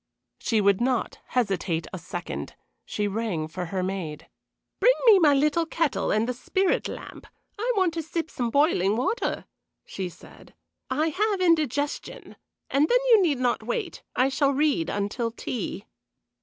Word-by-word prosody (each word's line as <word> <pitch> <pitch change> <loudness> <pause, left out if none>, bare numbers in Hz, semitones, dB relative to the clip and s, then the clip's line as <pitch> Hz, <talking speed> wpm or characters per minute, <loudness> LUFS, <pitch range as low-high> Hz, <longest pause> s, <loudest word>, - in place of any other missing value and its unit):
She 220 -2 +1
would 200 +1 +3
not 250 -1 0
hesitate 195 -8 0
a 185 - -4
second. 175 +1 -6 0.3
She 210 -1 -1
rang 200 -7 -2
for 180 +3 -5
her 185 +1 -2
maid. 180 -5 -4 0.5
"Bring - - +5
me 430 -5 +8
my 295 -5 +5
little 300 +4 +2
kettle 295 -13 0
and 215 +2 +2
the 250 - -1
spirit 375 +9 0
lamp. - - -9 0.3
I 475 +4 +1
want 370 -4 +2
to 330 - -2
sip 325 +1 -4
some 240 -2 -2
boiling 225 - +2
water," 265 - -1 0.4
she 190 -2 -5
said. - - -16 0.3
"I 300 +5 +1
have 410 +4 0
indigestion. 300 -5 0 0.4
And 290 +3 +3
then - - +5
you 440 -3 +8
need 315 -7 +2
not 245 -1 0
wait 470 -4 -3
I 255 - +3
shall 275 +1 +2
read 280 - +1
until 205 +4 -1
tea." 230 -1 -5
255 Hz, 155 wpm, -26 LUFS, 200-325 Hz, 0.5 s, me